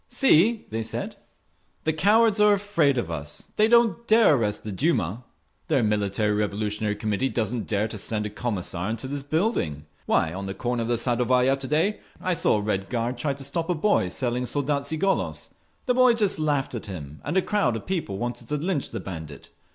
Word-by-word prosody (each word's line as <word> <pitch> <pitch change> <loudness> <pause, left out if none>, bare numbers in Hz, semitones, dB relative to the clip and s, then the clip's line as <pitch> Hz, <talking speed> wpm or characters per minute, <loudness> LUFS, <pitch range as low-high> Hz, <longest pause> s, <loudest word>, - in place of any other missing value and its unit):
"See!" 230 - +4
they 110 +1 -2
said. 110 - -4 0.7
"The 160 - +1
cowards 210 +6 +4
are 210 0 +6
afraid 195 -9 +1
of 95 -8 -2
us. 75 -2 -6
They 215 - +4
don't 235 0 +3
dare 220 -6 +6
arrest 105 -6 0
the 110 - -5
Duma! 115 - 0 0.4
Their 140 -6 +2
Military 105 0 +1
Revolutionary 105 0 -1
Committee 105 +5 -1
doesn't 115 -1 -2
dare 105 0 0
to 110 -1 -6
send 105 +1 -2
a 105 - -4
Commissar 100 -4 -3
into 115 +3 -4
this 140 +1 -4
building. 145 - -1 0.2
Why, 80 0 +2
on 95 +1 -5
the 95 - -5
corner 120 -1 -2
of 115 - -2
the 120 0 +1
Sadovaya 125 +2 +2
to 135 -1 -6
day, 165 +9 +1 0.2
I 185 - 0
saw 155 - +2
a - - -1
Red 100 -2 -2
Guard 120 0 -2
try 140 +2 -1
to 140 - -8
stop 165 +5 -3
a 180 - +2
boy 165 - +2
selling 125 +4 -1
Soldatski 145 +3 -1
Golos…. 195 +4 -1 0.4
The 250 - +2
boy 250 -1 +5
just 205 -7 +1
laughed 145 -4 0
at 115 - -6
him, 75 -6 -8
and 150 +6 -1
a - - +5
crowd 140 - +1
of 115 - -6
people 165 - -2
wanted 120 +2 -4
to 150 - -1
lynch 160 -1 -2
the - - -5
bandit. 80 -6 -8
125 Hz, 200 wpm, -25 LUFS, 105-165 Hz, 0.7 s, are